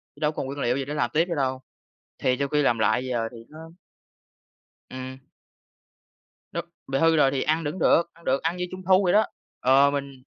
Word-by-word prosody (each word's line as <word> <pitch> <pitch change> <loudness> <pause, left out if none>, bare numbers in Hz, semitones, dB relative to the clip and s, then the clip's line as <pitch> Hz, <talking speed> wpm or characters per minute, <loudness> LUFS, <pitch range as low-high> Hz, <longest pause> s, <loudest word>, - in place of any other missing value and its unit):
chứ - - -18
đâu 150 - +2
có - - -18
còn - - -2
nguyên 140 +1 -6
liệu 120 -2 +1
gì 135 - -3
để 145 - -5
làm 125 -5 0
tiếp 160 +2 +3
nữa 170 - -1
đâu. 130 -2 -1 0.6
Thì 125 - +1
sau 140 - 0
khi 150 +1 +1
làm 120 -5 +2
lại 125 +3 +2
giờ 115 -3 -1
thì 115 - -10
nó 155 - -12 1.3
Ừm. 130 0 -7 1.3
Đúng, - - -3 0.2
bị 135 0 0
hư 165 +2 +4
rồi 140 -3 +4
thì 135 -1 -1
ăn 160 +2 0
vẫn 150 +5 -3
được, 170 - +4
ăn 170 - -21
được, 135 +1 +1
ăn 165 +2 -1
như 180 - -2
trung 185 0 -8
thu 190 +1 +5
vậy 175 - +3
đó. 215 +1 +5 0.4
Ờ, 135 +2 +5
mình 140 -1 -3
140 Hz, 230 wpm, -25 LUFS, 130-160 Hz, 1.3 s, thu